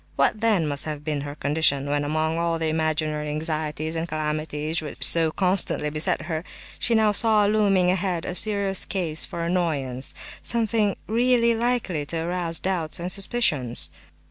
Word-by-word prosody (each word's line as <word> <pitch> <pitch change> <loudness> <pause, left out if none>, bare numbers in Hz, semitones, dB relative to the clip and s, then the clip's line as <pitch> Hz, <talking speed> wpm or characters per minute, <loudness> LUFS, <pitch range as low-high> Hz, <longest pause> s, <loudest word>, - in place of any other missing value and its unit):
What 215 - +1
then 215 -7 +2
must 145 -1 -1
have 150 -2 -5
been 150 -2 -2
her 145 0 -7
condition, 145 -2 +1
when, 145 0 0
among 155 +2 -1
all 170 0 0
the 160 -1 -1
imaginary 155 -1 -1
anxieties 155 0 -3
and 165 +1 -2
calamities 155 +1 -2
which 150 -2 -5
so 165 -1 +4
constantly 180 -4 +1
beset 155 +3 0
her, 160 0 -4 0.4
she 235 - +2
now 220 -1 +3
saw 215 0 +4
looming 200 -4 +2
ahead 180 -2 -2
a - - -4
serious 200 -1 +1
cause 170 -6 -1
for 170 - -5
annoyance—something 175 - -1
really 235 +1 +2
likely 230 -9 -1
to 165 - -2
arouse 170 0 +1
doubts 175 -4 -2
and 175 +2 -1
suspicions! 180 - +3
165 Hz, 155 wpm, -24 LUFS, 155-195 Hz, 0.4 s, so